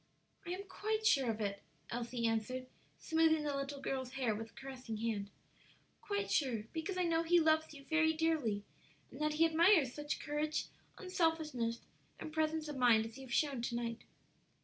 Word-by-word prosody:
"I - - -4
am 370 +3 -3
quite 430 +3 -2
sure 270 - +4
of 220 -1 -1
it," 200 -1 -2 0.3
Elsie 235 0 -2
answered, 225 +3 -1 0.3
smoothing 320 -1 +3
the 290 -1 -1
little 275 0 -3
girl's 260 -2 -3
hair 255 -5 0
with 225 +2 -7
caressing 260 -4 -6
hand, 210 -3 -2 0.7
"quite 405 -1 -2
sure; 245 -7 +1
because 330 +4 -3
I 365 - +2
know 330 -1 +2
he 345 +1 +4
loves 315 0 +3
you 280 -2 -11
very 320 +1 +3
dearly, 310 -11 0 0.5
and - - -9
that 305 0 +1
he 320 +2 +4
admires 325 -4 +5
such 295 0 -3
courage, 300 +1 -2 0.3
unselfishness, 320 -10 0 0.4
and 310 - -7
presence 315 0 0
of 295 -2 -5
mind 235 -3 +5
as 225 +3 -9
you 265 - -9
have - - -12
shown 280 -5 +1
to 240 0 -2
night." 235 -1 -3
290 Hz, 175 wpm, -36 LUFS, 235-320 Hz, 0.7 s, admires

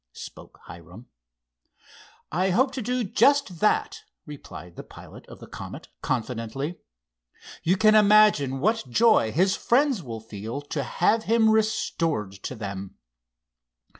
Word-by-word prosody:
spoke - - -12
Hiram. 90 +7 -13 1.3
"I 185 +4 0
hope 260 +8 +2
to 265 - -5
do 250 +2 -1
just 230 - +2
that," 215 - 0 0.2
replied 115 - -11
the - - -7
pilot - - -14
of - - -13
the - - -11
Comet, - - -10
confidently. 125 +6 -4 0.8
"You 180 +4 +1
can 215 +1 +5
imagine 210 -11 +4
what 220 - 0
joy 215 - +3
his 190 - +2
friends 260 -3 +1
will 115 -6 -7
feel 110 +3 -7
to 145 0 -4
have 220 +10 0
him 225 0 +3
restored 210 - 0
to 100 +6 -8
them." 100 -3 -7
175 Hz, 130 wpm, -25 LUFS, -, 1.3 s, can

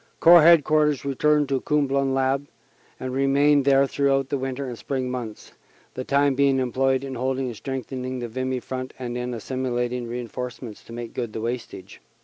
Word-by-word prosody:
Corps 170 0 +8
Headquarters 155 -3 +4
returned 145 +2 +2
to 135 -2 0
Comblain 140 -2 +1
1 - - 0
Abbe 135 +1 +1 0.5
and 130 -1 -4
remained 140 +1 +3
there 140 0 +5
throughout 135 -1 0
the 140 - 0
winter 135 +1 -3
and 125 - -5
spring 130 +1 -3
months, 120 -4 -6 0.4
the 130 - -5
time 140 +1 +2
being 140 0 +3
employed 130 +1 +1
in 135 -1 -5
holding 130 +1 -1
and 120 -2 -5
strengthening 130 +1 -5
the 120 -1 -4
Vimy 130 +2 -3
front 130 0 -6
and 125 -2 -5
in 125 0 -3
assimilating 125 0 -3
reinforce 120 0 -5
ments 115 -5 -9
to - - -13
make 120 -1 -7
good 120 -4 -4
the 110 - -4
wastage. 120 +1 -6
130 Hz, 180 wpm, -24 LUFS, 125-140 Hz, 0.5 s, Corps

